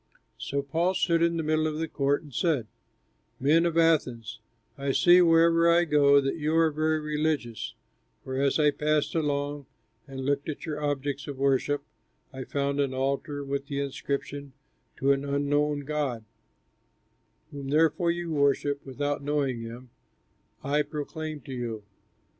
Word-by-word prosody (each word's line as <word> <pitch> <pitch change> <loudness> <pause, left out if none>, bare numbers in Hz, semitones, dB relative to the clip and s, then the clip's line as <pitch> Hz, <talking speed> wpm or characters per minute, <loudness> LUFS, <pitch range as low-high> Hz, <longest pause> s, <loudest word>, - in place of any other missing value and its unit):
So 140 0 -2
Paul 165 +6 0
stood 170 -2 +2
in 170 0 +2
the 165 - -1
middle 155 0 +1
of 155 -1 -3
the 160 +1 -2
Court 140 -1 0
and 145 -3 -14
said, 150 -5 +1 0.7
"Men 160 +6 +4
of 165 -1 -2
Athens, 125 -10 +1 0.4
I 140 -1 -2
see 175 +4 +6
wherever 165 0 +5
I 170 +1 +4
go 145 -2 +5
that 135 +2 -1
you 155 0 -1
are 165 -1 +4
very 155 +1 0
religious, 150 -6 -2 0.5
for 130 - -5
as 140 +1 +2
I 150 -2 +4
passed 150 0 0
along 145 -3 -2 0.4
and 135 -1 -6
looked 140 +2 0
at 150 - -5
your 150 -2 -4
objects 145 0 -2
of 140 -2 -6
worship, 140 +1 +1 0.5
I 130 -1 -6
found 140 0 -1
an 135 -2 0
altar 140 +2 -2
with 140 0 -3
the 140 -1 -3
inscription, 140 0 -4 0.4
TO 135 +1 +2
AN 140 0 +1
UNKNOWN 145 +1 0
GOD 140 -6 -3 1.3
Whom, 140 -2 -7
therefore, 160 +4 +2
you 170 0 -2
worship 140 -1 +1
without 145 +2 -3
knowing, 140 -4 -1
him 120 +2 -9 0.7
I 145 +2 +1
proclaim 150 +1 -5
to 135 - -8
you. 115 -4 -4
145 Hz, 155 wpm, -27 LUFS, 140-155 Hz, 1.3 s, see